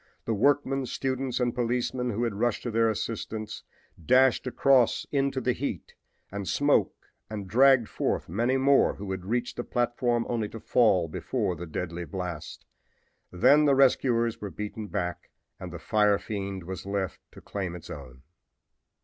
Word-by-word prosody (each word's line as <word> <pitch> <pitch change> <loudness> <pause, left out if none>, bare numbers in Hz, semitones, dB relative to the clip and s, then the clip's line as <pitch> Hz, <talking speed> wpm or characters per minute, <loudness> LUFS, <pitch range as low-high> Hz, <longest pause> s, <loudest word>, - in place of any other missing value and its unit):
The 115 - 0
workmen, 135 +3 +2
students 130 0 -2
and 120 -1 +1
policemen 125 +1 -1
who 115 +1 -1
had 115 -3 -1
rushed 115 +2 -1
to 120 - -3
their 115 0 +3
assistance 110 0 -4 0.4
dashed 130 - +4
across 125 -1 +3
into 140 -1 0
the 125 -1 +1
heat 140 +4 -5 0.4
and 100 -1 -5
smoke 145 - +2 0.3
and 105 -3 -5
dragged 125 +2 +5
forth - - -2
many 120 +9 +1
more 135 +1 +4
who 100 -1 -6
had 95 -1 -5
reached 120 +4 -2
the 120 - -2
platform 120 -1 0
only 115 -3 -2
to 115 - -8
fall 100 -8 +3
before 90 +3 -2
the 85 +1 -7
deadly 85 +2 -4
blast. 90 -4 -6 0.7
Then 145 +12 +5
the 140 -2 +4
rescuers 120 -3 +2
were 105 - -4
beaten 105 +2 -6
back 90 -4 -4 0.3
and 90 -1 -7
the 85 - -6
fire 105 +2 +2
fiend 100 -3 -5
was 95 +2 -7
left 100 -2 -2
to - - -12
claim 95 -4 -5
its 90 0 -10
own. 65 -5 -10
115 Hz, 160 wpm, -27 LUFS, 95-125 Hz, 0.7 s, dragged